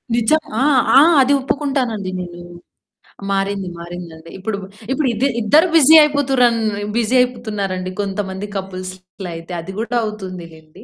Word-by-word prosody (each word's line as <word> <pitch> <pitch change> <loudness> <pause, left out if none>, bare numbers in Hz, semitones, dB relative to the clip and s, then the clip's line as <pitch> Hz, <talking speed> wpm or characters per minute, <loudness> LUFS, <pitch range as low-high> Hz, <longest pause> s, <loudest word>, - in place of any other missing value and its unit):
నిజం. 240 +7 +3 0.2
ఆ! - - +1 0.4
ఆ! - - +10 0.2
అది 270 +2 +3
ఒప్పుకుంటానండి 260 -8 -2
నేను. 175 -1 -7 0.9
మారింది, 195 -1 -1
మారిందండి. 170 -1 -9
ఇప్పుడు 200 +2 -4 0.3
ఇప్పుడు 275 +1 0
ఇదే 240 +5 +1
ఇద్దరు 305 - +4
బిజీ 315 0 +7
అయిపోతురన్ 270 -5 +2 0.4
బిజీ 235 +2 +1
అయిపోతున్నారండి 210 -7 -3
కొంతమంది 195 0 -4
కపుల్స్‌ 185 -1 -5 0.3
లైతే. 165 +1 -8
అది 165 - -8
గూడా 235 +2 -2
అవుతుంది‌లేండి. 175 -7 -9
205 Hz, 120 wpm, -18 LUFS, 185-250 Hz, 0.9 s, ఆ